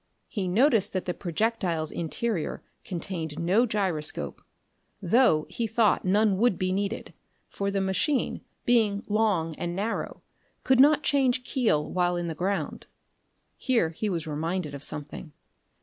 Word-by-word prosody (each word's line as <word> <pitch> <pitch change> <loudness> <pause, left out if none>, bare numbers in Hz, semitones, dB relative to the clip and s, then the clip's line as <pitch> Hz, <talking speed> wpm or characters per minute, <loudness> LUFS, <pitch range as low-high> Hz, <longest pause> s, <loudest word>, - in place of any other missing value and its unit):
He 200 -5 -3
noticed 220 +1 +3
that 185 - -2
the 180 - -1
projectile's 175 -3 -1
interior 175 +2 -3 0.2
contained 165 -4 -4
no 190 +9 +2
gyroscope: 185 -8 -1 0.6
though, 190 -5 +3
he 225 +7 -3
thought, 220 -2 +2
none 200 +1 +2
would 235 -4 +3
be 185 0 -1
needed, 200 +3 -3 0.3
for 200 0 -3
the 195 0 0
machine, 190 +9 0 0.2
being 220 -4 +3
long 205 -7 +1
and 175 0 -3
narrow, 210 +4 -3 0.4
could 260 -1 +3
not 295 +2 +6
change 260 -3 +2
keel 225 - 0
while 180 -1 +1
in 175 0 -2
the 165 - -3
ground. 190 +5 -3 0.7
Here 230 -11 +1
he 210 +6 -3
was 170 -4 -2
reminded 160 +1 -3
of 140 - -7
something. 145 +1 -4
195 Hz, 140 wpm, -27 LUFS, 170-225 Hz, 0.7 s, not